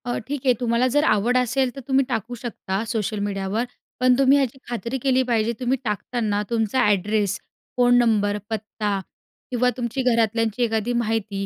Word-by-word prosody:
अ, 245 Hz, -, -1 dB
ठीक 280 Hz, -1 st, -4 dB
आहे, 255 Hz, -, +5 dB
तुम्हाला 240 Hz, +1 st, +2 dB
जर 290 Hz, +1 st, +3 dB
आवड 235 Hz, -1 st, +2 dB
असेल 250 Hz, +1 st, +1 dB
तर -, -, -6 dB
तुम्ही 270 Hz, 0 st, +3 dB
टाकू 240 Hz, 0 st, -3 dB
शकता 215 Hz, -4 st, -4 dB
सोशल 215 Hz, -2 st, -2 dB
मीडियावर. 200 Hz, +3 st, -2 dB, 0.3 s
पण 255 Hz, 0 st, +5 dB
तुम्ही 275 Hz, +1 st, +5 dB
याची 270 Hz, -2 st, 0 dB
खात्री 240 Hz, +2 st, -3 dB
केली 260 Hz, 0 st, +2 dB
पाहिजे, 230 Hz, -2 st, +1 dB
तुम्ही 255 Hz, +1 st, +1 dB
टाकताना 210 Hz, -1 st, -1 dB
तुमचा 225 Hz, +1 st, 0 dB
ॲड्रेस, 205 Hz, 0 st, +1 dB, 0.4 s
फोन 245 Hz, 0 st, +5 dB
नंबर, 210 Hz, -4 st, +2 dB
पत्ता 210 Hz, -2 st, -2 dB, 0.5 s
किंवा 250 Hz, 0 st, +2 dB
तुमची 245 Hz, +2 st, -2 dB
घरातल्यांची 230 Hz, -1 st, +1 dB
एखादी 225 Hz, +1 st, 0 dB
माहिती, 215 Hz, -3 st, -2 dB
235 Hz, 160 wpm, -23 LUFS, 215-250 Hz, 0.5 s, आहे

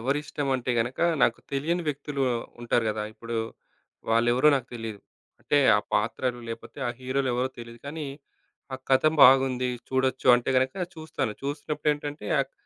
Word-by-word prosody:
ఎవరిష్టం 145 Hz, +2 st, -2 dB
అంటే 125 Hz, -1 st, -2 dB
గనక, 120 Hz, +3 st, -1 dB, 0.2 s
నాకు -, -, +3 dB
తెలియని 165 Hz, +6 st, 0 dB
వ్యక్తులు 140 Hz, -1 st, -3 dB, 0.4 s
ఉంటారు 120 Hz, -1 st, +1 dB
గదా! 105 Hz, 0 st, -2 dB
ఇప్పుడు 115 Hz, +1 st, -6 dB, 0.7 s
వాళ్ళెవరో 120 Hz, +5 st, +4 dB
నాకు 130 Hz, -3 st, -1 dB
తెలీదు. 110 Hz, -3 st, -6 dB, 0.4 s
అంటే -, -, +2 dB, 0.2 s
ఆ -, -, +3 dB
పాత్రలు 125 Hz, -1 st, 0 dB
లేపోతే, 115 Hz, +5 st, -8 dB
ఆ -, -, 0 dB
హీరోలు 130 Hz, +1 st, -1 dB
ఎవరో 125 Hz, +2 st, 0 dB
తెలీదు. 115 Hz, 0 st, -9 dB
కానీ 150 Hz, +2 st, -5 dB, 0.7 s
ఆ -, -, -3 dB
కథం 145 Hz, +4 st, +4 dB
బాగుంది, 130 Hz, -1 st, +5 dB, 0.2 s
చూడొచ్చు 130 Hz, 0 st, 0 dB
అంటే 120 Hz, -, -2 dB
గనక 130 Hz, 0 st, +2 dB, 0.2 s
చూస్తాను. 155 Hz, -8 st, -3 dB
చూసినప్పుడేంటంటే 145 Hz, 0 st, -2 dB
అక్ 135 Hz, 0 st, -4 dB
130 Hz, 140 wpm, -26 LUFS, 120-145 Hz, 0.7 s, బాగుంది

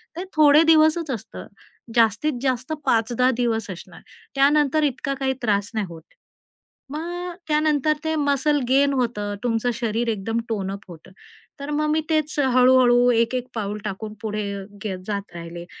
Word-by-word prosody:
ते 350 Hz, -, -4 dB
थोडे 300 Hz, 0 st, +6 dB
दिवसच 315 Hz, -1 st, +4 dB
असतं. 230 Hz, -, -7 dB, 0.5 s
जास्तीत 230 Hz, +6 st, +3 dB
जास्त 260 Hz, +2 st, -1 dB
5-10 240 Hz, +2 st, +2 dB
दिवस 225 Hz, -4 st, -1 dB
असणार 175 Hz, -, -11 dB, 0.3 s
त्यानंतर 295 Hz, +2 st, +3 dB
इतका 275 Hz, 0 st, -1 dB
काही 265 Hz, -1 st, 0 dB
त्रास 205 Hz, -3 st, 0 dB
नाही 215 Hz, -3 st, -1 dB
होत. 165 Hz, -1 st, -10 dB, 0.9 s
मग 350 Hz, +4 st, -5 dB
त्यानंतर 305 Hz, -1 st, +2 dB
ते 320 Hz, 0 st, -1 dB
मसल 290 Hz, 0 st, +1 dB
गेन 280 Hz, +2 st, +4 dB
होतं, 220 Hz, -6 st, -1 dB
तुमचं 240 Hz, 0 st, 0 dB
शरीर 230 Hz, 0 st, -2 dB
एकदम 225 Hz, +2 st, -2 dB
टोन 195 Hz, -3 st, -2 dB
अप 200 Hz, +2 st, -8 dB
होतं. 170 Hz, +1 st, -13 dB, 0.5 s
तर 280 Hz, -, -6 dB
मग 305 Hz, +1 st, 0 dB
मी 315 Hz, +1 st, +2 dB
तेच 310 Hz, -1 st, 0 dB
हळू-हळू 250 Hz, -2 st, +5 dB
एक-एक 240 Hz, +2 st, 0 dB
पाऊल 210 Hz, -2 st, -3 dB
टाकून 210 Hz, +2 st, -5 dB
पुढे 215 Hz, -1 st, -3 dB, 0.4 s
गे 210 Hz, -, -2 dB
अ, 185 Hz, -, -5 dB
जात 200 Hz, -3 st, -4 dB
राहिले 170 Hz, 0 st, -8 dB
250 Hz, 150 wpm, -23 LUFS, 215-295 Hz, 0.9 s, थोडे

